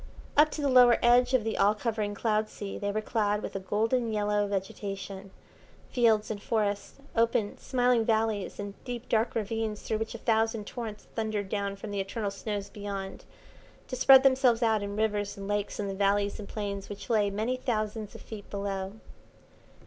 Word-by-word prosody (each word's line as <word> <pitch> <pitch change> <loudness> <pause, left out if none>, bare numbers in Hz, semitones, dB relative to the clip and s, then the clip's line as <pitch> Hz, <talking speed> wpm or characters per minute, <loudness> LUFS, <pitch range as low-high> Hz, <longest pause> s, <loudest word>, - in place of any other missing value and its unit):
Up 300 +1 +6
to 300 - -4
the - - +3
lower 250 -2 +7
edge 245 +2 +5
of 245 - +2
the 225 0 -2
all 205 +2 +4
covering 215 -2 -2
cloud 215 0 0
sea 200 -1 -6
they 205 -1 -1
were 215 +1 -1
clad 210 -2 0
with - - -5
a - - -1
golden 225 +5 0
yellow 210 -1 +1
vegetation, 195 0 -5 0.6
fields 225 -4 +3
and 205 -2 -5
forests, 205 -3 -1 0.2
open, 230 -2 +1
smiling 250 -2 +2
valleys, 220 -2 0
and 200 0 -5
deep, 245 -1 -6
dark 225 +1 +1
ravines 220 -1 -2
through 220 - -1
which 225 +1 -4
a - - -4
thousand 225 -1 +1
torrents 220 -3 -6
thundered 215 -3 -2
down 200 -1 -2
from 205 +1 -7
the 200 - -2
eternal 200 +1 -2
snows 200 0 -4
beyond, 200 -2 -6 0.6
to 255 - -4
spread 265 +1 +8
themselves 260 -3 +4
out 220 -2 +3
in 200 0 -4
rivers 205 -2 -1
and 195 0 -6
lakes 205 0 -2
in 205 - -1
the 195 - -3
valleys 200 +1 +1
and 205 - -8
plains 200 -2 -4
which 205 0 -8
lay 210 -3 +3
many 220 +5 -1
thousands 215 -4 -3
of - - -9
feet 210 -3 -9
below. 195 -1 -3
215 Hz, 185 wpm, -29 LUFS, 200-230 Hz, 0.6 s, spread